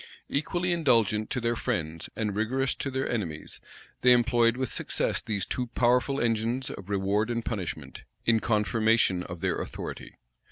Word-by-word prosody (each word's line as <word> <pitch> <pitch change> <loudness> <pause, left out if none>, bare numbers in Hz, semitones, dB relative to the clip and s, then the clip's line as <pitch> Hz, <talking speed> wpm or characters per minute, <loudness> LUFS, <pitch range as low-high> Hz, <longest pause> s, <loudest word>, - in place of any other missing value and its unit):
Equally 175 +5 0
indulgent 115 - +2
to 125 - -1
their 120 0 0
friends 80 -5 -3
and 105 -3 -2
rigorous 125 +5 0
to 140 - -4
their 130 0 -1
enemies, 85 -10 -4 0.4
they 125 0 +7
employed 120 -1 +3
with 130 -2 -2
success - - 0
these 100 -4 -1
two 125 -1 -2
powerful 125 +3 +3
engines 115 +3 0
of 95 - -9
reward 100 +2 +1
and 115 -1 -2
punishment, 95 -8 -4 0.2
in 115 -1 +4
confirmation 110 -3 +2
of 85 -2 -7
their - - 0
authority. - - -6
115 Hz, 155 wpm, -28 LUFS, 105-125 Hz, 0.4 s, they